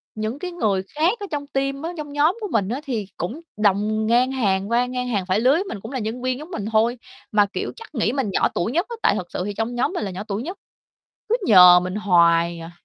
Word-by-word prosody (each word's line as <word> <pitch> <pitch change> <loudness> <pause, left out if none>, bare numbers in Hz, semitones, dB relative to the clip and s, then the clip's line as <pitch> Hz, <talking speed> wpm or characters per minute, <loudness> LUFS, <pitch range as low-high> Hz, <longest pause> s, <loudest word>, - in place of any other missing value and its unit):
những 220 +5 -3
cái 365 - -5
người 210 - 0
khác 345 +10 +1
ở 405 - -5
trong 285 -1 -3
team 275 0 -2
á, 330 - -4
trong 295 -2 -6
nhóm 310 +8 +2
của 420 - -2
mình 205 -4 +1
á 255 +6 -3
thì 225 -7 -3
cũng 230 - -4 0.2
đồng 210 +1 +1
ngang 245 +3 +3
hàng 200 -6 0
qua 245 +1 +3
ngang 250 0 -3
hàng 205 -6 -1
phải 185 +3 +1
lứa 255 +3 +4
với 350 +5 +1
mình, 375 - -7
cũng 225 - -8
là 260 - -3
nhân 225 +3 -4
viên 255 0 -1
giống 310 +5 -10
mình 205 - -4
thôi 230 +3 +2 0.3
mà, 210 -1 +4
kiểu, - - -3
chắc 455 -9 -13
nghĩ 225 -2 +1
mình 270 -7 -1
nhỏ - - +2
tuổi 175 - -1
nhất 345 +8 +1
á, 470 - -5
tại - - +4
thật 180 - -4
sự - - -3
thì 205 - -3
trong 225 +3 -3
nhóm 245 +9 0
mình 225 - -2
là 195 - -4
nhỏ 185 +2 -6
tuổi 205 +3 -3
nhất, 360 +7 -6 0.7
cứ 465 - +3
nhờ 180 -4 +9
mình 180 +1 -4
hoài 170 -4 +3
à. 165 +1 -9
230 Hz, 265 wpm, -22 LUFS, 200-280 Hz, 0.7 s, nhờ